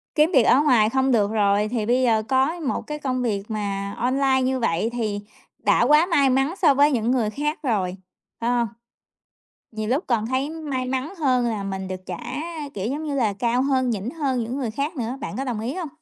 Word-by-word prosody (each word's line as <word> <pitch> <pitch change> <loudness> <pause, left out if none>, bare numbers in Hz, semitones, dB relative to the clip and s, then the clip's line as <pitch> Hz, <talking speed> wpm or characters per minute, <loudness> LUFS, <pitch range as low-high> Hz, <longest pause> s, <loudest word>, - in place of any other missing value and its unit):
kiếm 310 +4 +4
việc 260 - +6
ở 265 - +5
ngoài 245 -8 +4
không 265 +1 +1
được 210 -3 +2
rồi, 205 -1 +2
thì 225 -2 -2
bây 250 +3 +2
giờ 220 -3 +3
có 270 +8 +1
một 285 -4 -2
cái 300 0 -4
công 255 -3 -2
việc 205 -5 -1
mà 200 -2 -3
online 265 +1 +2
như 260 0 0
vậy 220 -1 0
thì 215 -4 -2 0.4
đã - - +3
quá 300 +6 +5
may 290 -7 +3
mắn 270 +5 +1
so 300 -6 +6
với 290 +2 +4
những 235 -2 +1
người 240 -5 +1
khác 295 +7 -2
rồi, 190 -7 0 0.4
phải 235 +1 -1
hông? 240 -1 +1 1.1
Nhiều 215 0 -4
lúc 280 +8 +1
còn 225 -3 0
thấy 260 +4 -1
may 290 -6 -4
mắn 265 +7 -3
hơn 255 -5 +2
là 220 -4 -2
mình 190 -1 -4
được 185 -1 -5
trả, 175 -2 -5 0.6
kiểu 195 0 -3
giống 295 +3 -3
như 295 -2 -3
là, 230 -7 +1
cao 235 +5 0
hơn, 260 -2 +1
nhỉnh 220 +1 -3
hơn 275 -6 -1
những 245 +4 -4
người 245 -5 -2
khác 285 +8 -3
nữa, 245 +1 -3
bạn - - -5
có 270 - -2
đồng 240 -5 -3
ý 245 +5 -3
hông? 350 -5 -4
255 Hz, 225 wpm, -23 LUFS, 220-275 Hz, 1.1 s, việc